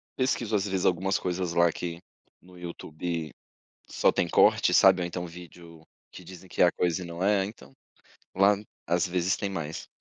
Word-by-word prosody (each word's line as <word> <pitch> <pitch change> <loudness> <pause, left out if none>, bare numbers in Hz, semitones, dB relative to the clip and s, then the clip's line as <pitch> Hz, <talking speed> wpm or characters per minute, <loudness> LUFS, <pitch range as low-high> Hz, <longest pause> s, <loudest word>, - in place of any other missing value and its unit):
pesquiso 120 -4 0
às 100 0 0
vezes, 95 -1 -1
algumas 95 +1 +1
coisas 90 -1 -3
lá 85 -1 +4
que, 85 0 -6 0.4
no 90 0 -18
YouTube, 85 -2 -5 0.6
só - - +2
tem - - 0
corte, - - +4
sabe, 90 - +6
ou 85 - -1
então 90 +1 -5
vídeo 85 -1 -12 0.3
que 90 - -11
dizem 95 +1 -12
que - - -3
é - - +8
a 85 - +3
coisa 90 +1 -1
e - - -6
não 85 +2 -5
é, 100 -1 +2
então, 70 - -12 0.6
lá 100 +2 +4 0.3
às 85 +1 +2
vezes 90 +1 0
tem 100 - -3
mais. 80 -4 -5
90 Hz, 185 wpm, -27 LUFS, 85-95 Hz, 0.6 s, é